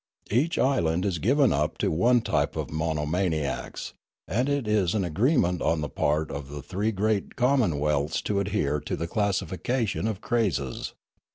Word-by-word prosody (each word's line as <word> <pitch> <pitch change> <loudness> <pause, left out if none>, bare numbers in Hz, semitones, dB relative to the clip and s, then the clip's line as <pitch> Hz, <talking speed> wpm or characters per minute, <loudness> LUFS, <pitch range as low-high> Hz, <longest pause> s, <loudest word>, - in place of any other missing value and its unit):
Each 140 +10 +2
island 90 -10 +2
is 90 -5 -1
given 130 - +3
up 75 +2 0
to - - 0
one 120 +9 +3
type - - 0
of - - -4
monomaniacs; 80 0 -2 0.3
and 125 - 0
it 140 -5 0
is 105 -3 +2
an 100 - +1
agreement 90 - +2
on 80 -1 +1
the 75 - -3
part 75 +4 0
of 70 -1 -6
the 75 -1 -7
three 100 +8 -1
great 105 0 -1
commonwealths 80 - +1
to 100 -1 0
adhere 95 -8 0
to - - -4
the 85 - -3
classification 105 +4 -1
of 110 -4 -2
crazes. 95 - -1
95 Hz, 160 wpm, -26 LUFS, 75-110 Hz, 0.3 s, given